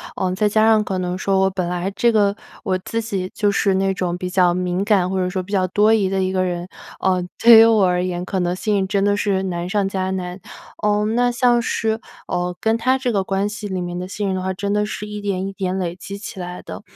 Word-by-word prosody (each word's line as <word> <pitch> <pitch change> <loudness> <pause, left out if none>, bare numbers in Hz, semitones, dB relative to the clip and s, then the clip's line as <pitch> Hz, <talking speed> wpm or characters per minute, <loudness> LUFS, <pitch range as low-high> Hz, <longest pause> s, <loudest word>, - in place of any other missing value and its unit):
嗯， 185 -1 -1
再 210 +3 +1
加 215 +1 +3
上 220 -1 +5
可 190 -2 -3
能 180 0 -2
说 195 0 +1
我 190 - +3
本 185 -2 -3
来 180 +2 -2
这 235 +2 +3
个 205 -2 +2 0.3
我 190 -4 0
自 230 +4 -3
己 195 -4 -3
就 205 -2 +2
是 200 -1 +2
那 195 0 +1
种 175 -1 -2
比 180 0 -4
较 180 -1 +3
敏 180 +1 -1
感 195 -4 +2
或 190 - -2
者 180 -1 0
说 185 0 -3
比 200 - -12
较 185 -2 +2
多 210 +4 +3
疑 205 -4 +2
的 190 -1 0
一 185 - 0
个 185 -1 +1
人， 175 0 -3 0.3
呃， 185 -1 +2 0.2
对 230 -1 +10
于 225 - +9
我 220 -4 +4
而 180 -1 +1
言， 180 -1 -2
可 190 0 -2
能 175 0 0
信任 200 -1 0
真 200 0 0
的 205 0 +2
是 195 -2 0
难 175 -1 -3
上 200 -1 +1
加 190 -1 -2
难。 180 0 -4 0.4
嗯， 210 +1 +1
那 245 0 +3
像 240 0 +3
是， 220 -1 -1 0.3
呃， 175 0 -2
跟 225 +1 +2
他 255 +3 +2
这 255 -2 -1
个 195 -3 +1
关 195 +2 0
系 210 0 -6
里 185 -2 -3
面 175 0 -4
的 180 - -5
信 200 +1 -3
任 190 - -1
的 185 - -2
话， 190 0 -2
真 200 +2 -3
的 210 0 +1
是 210 0 -5
一 210 0 -6
点 195 -2 -2
一 195 - -4
点 190 -1 -2
累 175 -2 -2
积 200 +2 -8
起 200 -2 -8
来 180 0 -6
的。 - - -8
195 Hz, 285 characters per minute, -20 LUFS, 185-210 Hz, 0.4 s, 对